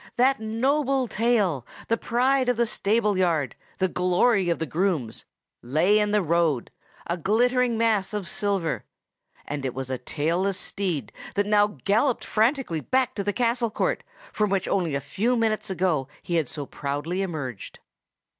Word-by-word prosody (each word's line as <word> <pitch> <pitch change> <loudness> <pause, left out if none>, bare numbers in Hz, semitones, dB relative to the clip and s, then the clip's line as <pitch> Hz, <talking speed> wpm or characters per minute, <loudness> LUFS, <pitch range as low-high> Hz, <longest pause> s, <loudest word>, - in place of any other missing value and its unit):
That 265 +2 +3
noble 260 +4 +1
tail, 210 - +1 0.2
the 230 - +2
pride 255 +3 +1
of 245 - +1
the 235 - +3
stable 210 -2 +1
yard, 160 -8 +1 0.2
the 190 - +2
glory 180 +2 +2
of 170 - +1
the 160 - -2
grooms, 160 - -1 0.4
lay 160 - +3
in 210 0 +1
the 210 -1 +2
road, 165 -6 +1 0.3
a 170 - -2
glittering 240 +6 +2
mass 220 -4 +2
of 205 -4 -3
silver; 195 -6 -1 0.6
and 145 -1 -4
it 130 -2 -3
was 130 0 -4
a 130 - -2
tailless 170 +9 -1
steed 170 - -2 0.2
that 205 0 +2
now 210 0 +2
galloped 225 +5 +2
frantically 225 - +1
back 260 - +1
into 200 - -4
the 205 - 0
castle 235 +1 +1
court, - - -1 0.3
from 210 -1 +1
which 195 -1 0
only 170 -7 0
a 140 - -1
few 205 - 0
short 245 - +1
minutes 215 -2 0
ago 175 -7 0 0.2
he 175 - 0
had 155 -6 0
so 145 -2 -5
proudly 145 +7 -3
emerged. 145 - -5
195 Hz, 165 wpm, -25 LUFS, 165-230 Hz, 0.6 s, That